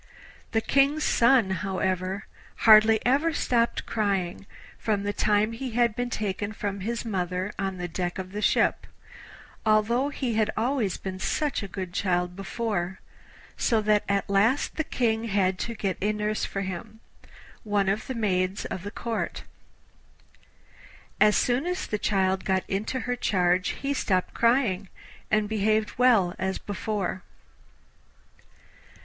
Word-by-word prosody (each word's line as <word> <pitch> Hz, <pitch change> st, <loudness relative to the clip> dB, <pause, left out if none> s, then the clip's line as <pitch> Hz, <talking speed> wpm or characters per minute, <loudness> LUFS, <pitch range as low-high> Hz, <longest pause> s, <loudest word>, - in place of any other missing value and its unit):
The 225 Hz, -, +1 dB
King's 280 Hz, +5 st, +2 dB
son, 235 Hz, -7 st, +4 dB
however, 190 Hz, 0 st, -2 dB, 0.4 s
hardly 220 Hz, 0 st, +8 dB
ever 290 Hz, +6 st, +3 dB
stopped 235 Hz, -4 st, 0 dB
crying 195 Hz, -3 st, -1 dB, 0.3 s
from 210 Hz, -3 st, 0 dB
the 205 Hz, 0 st, -1 dB
time 210 Hz, +1 st, +2 dB
he 235 Hz, +1 st, -5 dB
had 235 Hz, -3 st, +3 dB
been 245 Hz, +1 st, -2 dB
taken 205 Hz, -2 st, -3 dB
from 200 Hz, -1 st, -4 dB
his 230 Hz, +5 st, -3 dB
mother 185 Hz, -2 st, -2 dB
on 195 Hz, -1 st, -2 dB
the 175 Hz, 0 st, -3 dB
deck 175 Hz, +1 st, -3 dB
of 185 Hz, -1 st, -6 dB
the 210 Hz, +1 st, -4 dB
ship, -, -, +2 dB, 0.8 s
although 225 Hz, +5 st, +2 dB
he 260 Hz, -4 st, -2 dB
had 215 Hz, -1 st, +2 dB
always 230 Hz, -3 st, 0 dB
been 185 Hz, -1 st, -6 dB
such 295 Hz, +7 st, -1 dB
a 200 Hz, -, -5 dB
good 185 Hz, -1 st, -6 dB
child 180 Hz, -2 st, 0 dB
before, 195 Hz, -2 st, -3 dB, 0.6 s
so 225 Hz, -, +2 dB
that 210 Hz, 0 st, +3 dB
at 200 Hz, 0 st, +1 dB
last 205 Hz, +8 st, +2 dB
the 315 Hz, -, 0 dB
King 230 Hz, -6 st, 0 dB
had 190 Hz, -3 st, +1 dB
to 235 Hz, -, -3 dB
get 195 Hz, -4 st, -2 dB
a 205 Hz, +2 st, +2 dB
nurse 210 Hz, 0 st, -1 dB
for 195 Hz, -, -4 dB
him 195 Hz, +4 st, -6 dB, 0.6 s
one 205 Hz, -2 st, +1 dB
of 200 Hz, +3 st, -1 dB
the 260 Hz, -, -4 dB
maids 190 Hz, -3 st, 0 dB
of 185 Hz, -, -4 dB
the 200 Hz, -, -5 dB
Court. 230 Hz, +2 st, -4 dB, 1.8 s
As 210 Hz, 0 st, +5 dB
soon 250 Hz, +6 st, +1 dB
as 360 Hz, +1 st, -2 dB
the 210 Hz, -, -3 dB
child 190 Hz, -2 st, +1 dB
got 190 Hz, -1 st, +1 dB
into 215 Hz, +6 st, -2 dB
her 245 Hz, 0 st, -2 dB
charge 185 Hz, -5 st, +1 dB
he 280 Hz, +1 st, 0 dB
stopped 185 Hz, -8 st, 0 dB
crying, 230 Hz, -6 st, +2 dB, 0.4 s
and 215 Hz, -1 st, +2 dB
behaved 215 Hz, +1 st, 0 dB
well 225 Hz, -8 st, +4 dB
as 190 Hz, 0 st, -1 dB
before. 205 Hz, -2 st, -3 dB
210 Hz, 145 wpm, -26 LUFS, 190-230 Hz, 1.8 s, hardly